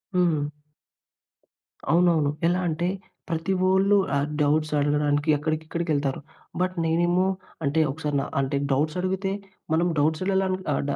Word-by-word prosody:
హ్మ్. 170 Hz, -5 st, +2 dB, 1.5 s
అవునవును. 165 Hz, -4 st, +3 dB, 0.2 s
ఎలా 175 Hz, +1 st, +2 dB
అంటే 170 Hz, +2 st, -1 dB, 0.4 s
ప్రతి 165 Hz, +3 st, -1 dB
వోళ్ళు 190 Hz, +2 st, +4 dB, 0.2 s
ఆహ్, 140 Hz, +1 st, +1 dB
డౌట్స్ 155 Hz, +1 st, +2 dB
అడగడానికి 145 Hz, +1 st, +1 dB
అక్కడికి, 155 Hz, +2 st, -2 dB
ఇక్కడికి 170 Hz, +1 st, -3 dB
వెళ్తారు. 140 Hz, -2 st, -1 dB, 0.4 s
బట్ 185 Hz, 0 st, 0 dB
నేనేమో 175 Hz, +3 st, +2 dB, 0.4 s
అంటే 145 Hz, +2 st, +1 dB
ఒకసారి 150 Hz, 0 st, -3 dB
న -, -, -1 dB, 0.2 s
అంటే 135 Hz, +1 st, 0 dB
డౌట్స్ 150 Hz, +5 st, +1 dB
అడిగితే 190 Hz, +1 st, -1 dB, 0.4 s
మనం 165 Hz, +2 st, +3 dB
డౌట్స్‌లల 185 Hz, +6 st, +1 dB, 0.3 s
అ -, -, +2 dB
అవ్ -, -, 0 dB
160 Hz, 130 wpm, -25 LUFS, 145-180 Hz, 1.5 s, వోళ్ళు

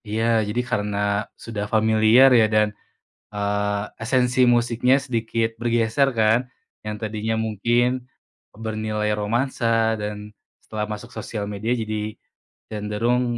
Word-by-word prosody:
Iya 110 Hz, +2 st, -1 dB, 0.3 s
jadi 120 Hz, +4 st, 0 dB
karena 105 Hz, 0 st, -1 dB, 0.5 s
sudah 105 Hz, -3 st, -3 dB
familiar 110 Hz, +4 st, +5 dB
ya 110 Hz, -, +6 dB
dan, 105 Hz, 0 st, +4 dB, 0.7 s
eee, 105 Hz, 0 st, -1 dB, 0.2 s
esensi 125 Hz, +1 st, +1 dB
musiknya 120 Hz, +2 st, +2 dB
sedikit 115 Hz, -3 st, -1 dB
bergeser 120 Hz, +3 st, +2 dB
kan, 110 Hz, +2 st, +4 dB, 0.4 s
yang 105 Hz, 0 st, -4 dB
tadinya 110 Hz, +1 st, -2 dB
mungkin 120 Hz, +4 st, +1 dB, 0.6 s
bernilai 110 Hz, -1 st, -2 dB
romansa 120 Hz, +5 st, -1 dB, 0.4 s
dan 105 Hz, 0 st, -3 dB, 0.5 s
setelah 110 Hz, -1 st, -4 dB
masuk 105 Hz, +3 st, -8 dB
sosial 105 Hz, -1 st, -4 dB
media 110 Hz, +4 st, -2 dB
jadi 110 Hz, 0 st, -3 dB, 0.7 s
cenderung, 110 Hz, +4 st, 0 dB
110 Hz, 110 wpm, -23 LUFS, 105-120 Hz, 0.7 s, ya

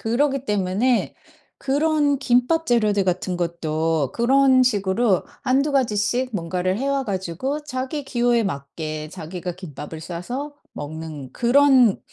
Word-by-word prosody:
그러기 270 Hz, +4 st, 0 dB
때문에 210 Hz, +4 st, +1 dB, 0.4 s
그런 290 Hz, 0 st, +1 dB
김밥 270 Hz, +6 st, +2 dB
재료들 210 Hz, -5 st, +2 dB
같은 180 Hz, 0 st, -1 dB
것도 160 Hz, -4 st, -1 dB
그런 260 Hz, +2 st, +4 dB
식으로 205 Hz, -2 st, +2 dB, 0.2 s
1-2 275 Hz, +3 st, +1 dB
가지씩 250 Hz, 0 st, +1 dB
뭔가를 180 Hz, +2 st, -1 dB
해 275 Hz, +2 st, -1 dB
와 275 Hz, -1 st, 0 dB
가지고 200 Hz, -, -3 dB
자기 265 Hz, +1 st, -4 dB
기호에 240 Hz, -2 st, +2 dB
맞게 155 Hz, -2 st, -5 dB
자기가 180 Hz, +1 st, -6 dB
김밥을 160 Hz, -3 st, -8 dB
싸서 245 Hz, -, -5 dB, 0.2 s
먹는 150 Hz, -2 st, -7 dB
그런 255 Hz, -3 st, +4 dB
220 Hz, 255 characters per minute, -22 LUFS, 175-265 Hz, 0.4 s, 그런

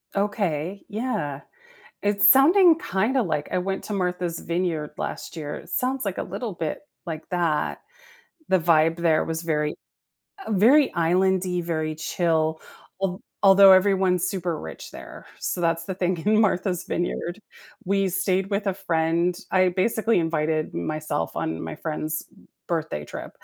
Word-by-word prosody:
Okay, 195 Hz, -3 st, -1 dB
yeah. 210 Hz, -, -3 dB, 0.6 s
It's 205 Hz, 0 st, +3 dB
sounding 330 Hz, +5 st, +7 dB
kinda 245 Hz, -, 0 dB
like 155 Hz, -7 st, -2 dB
I -, -, +1 dB
went 190 Hz, +1 st, -3 dB
to -, -, -6 dB
Martha's 180 Hz, -3 st, -2 dB
Vineyard 170 Hz, -3 st, -2 dB
last -, -, -5 dB
year. 150 Hz, -2 st, -5 dB
It -, -, -11 dB
sounds 260 Hz, 0 st, -1 dB
like 195 Hz, -3 st, -3 dB
a -, -, -1 dB
little 205 Hz, +4 st, -5 dB
bit 160 Hz, -3 st, -3 dB, 0.3 s
like 160 Hz, -1 st, -6 dB
that. 170 Hz, -4 st, 0 dB, 0.7 s
The 190 Hz, -, +3 dB
vibe 165 Hz, 0 st, +3 dB
there 165 Hz, -2 st, +2 dB
was 165 Hz, +1 st, -4 dB
very 150 Hz, -2 st, -1 dB, 0.7 s
uh, -, -, -2 dB
very 255 Hz, +9 st, +5 dB
island-y, 180 Hz, +1 st, +1 dB
very 155 Hz, -2 st, -2 dB
chill. 160 Hz, 0 st, 0 dB, 0.4 s
Al 190 Hz, -1 st, -1 dB, 0.2 s
although 195 Hz, 0 st, +8 dB
everyone's 185 Hz, -2 st, +4 dB
super 175 Hz, -4 st, -2 dB
rich 80 Hz, -, -8 dB
there. -, -, -11 dB
So -, -, -3 dB
that's 165 Hz, -1 st, 0 dB
the 190 Hz, -, -4 dB
thing 180 Hz, -1 st, -1 dB
in 215 Hz, +1 st, +4 dB
Martha's 185 Hz, -4 st, +1 dB
Vineyard. 175 Hz, +1 st, -3 dB, 0.5 s
We 195 Hz, 0 st, +1 dB
stayed 190 Hz, +1 st, 0 dB
with 200 Hz, +1 st, -1 dB
a 195 Hz, -, +1 dB
friend. 170 Hz, -1 st, 0 dB
I 185 Hz, -1 st, +4 dB
basically 220 Hz, +3 st, +1 dB
invited 155 Hz, -1 st, -1 dB
myself 155 Hz, -, -3 dB
on 80 Hz, 0 st, -2 dB
my 80 Hz, -1 st, -6 dB
friend's 155 Hz, 0 st, -3 dB, 0.4 s
birthday 160 Hz, -, -2 dB
trip -, -, -8 dB
180 Hz, 150 wpm, -24 LUFS, 160-195 Hz, 0.7 s, although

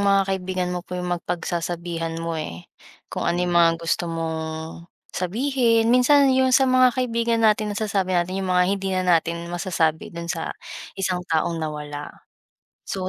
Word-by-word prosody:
mga 195 Hz, -1 st, +4 dB
kaibigan 185 Hz, -1 st, -2 dB
mo 180 Hz, -, -2 dB
po 180 Hz, +1 st, -7 dB
'yung 180 Hz, 0 st, -2 dB
mag 175 Hz, -, -2 dB
pagsasabihan 170 Hz, -1 st, -3 dB
mo 165 Hz, 0 st, -3 dB
eh, 150 Hz, -, -5 dB, 0.5 s
kung -, -, -1 dB
ano 175 Hz, +1 st, +1 dB
'yung 175 Hz, -, -1 dB
mga 170 Hz, -1 st, +6 dB
gusto 170 Hz, +1 st, -1 dB
mong, 160 Hz, 0 st, -5 dB, 0.2 s
sabihin. 230 Hz, +3 st, +1 dB
Minsan 270 Hz, +2 st, +5 dB
'yung 260 Hz, 0 st, +3 dB
sa 260 Hz, +1 st, +5 dB
mga 255 Hz, -1 st, +4 dB
kaibigan 230 Hz, -2 st, +1 dB
natin 210 Hz, -1 st, +2 dB
nasasabi 195 Hz, -4 st, 0 dB
natin 185 Hz, +2 st, -1 dB
'yung 190 Hz, -, -3 dB
mga 180 Hz, -, +5 dB
hindi 195 Hz, -1 st, -2 dB
na 185 Hz, -1 st, 0 dB
natin 170 Hz, -1 st, +1 dB
masasabi 170 Hz, -3 st, 0 dB
dun 170 Hz, 0 st, -4 dB
sa 165 Hz, -, -4 dB, 0.5 s
isang 185 Hz, -2 st, -1 dB
taong 165 Hz, +1 st, 0 dB
nawala. 150 Hz, -1 st, -5 dB, 0.8 s
So 185 Hz, -1 st, -3 dB
180 Hz, 165 wpm, -23 LUFS, 165-210 Hz, 0.8 s, mga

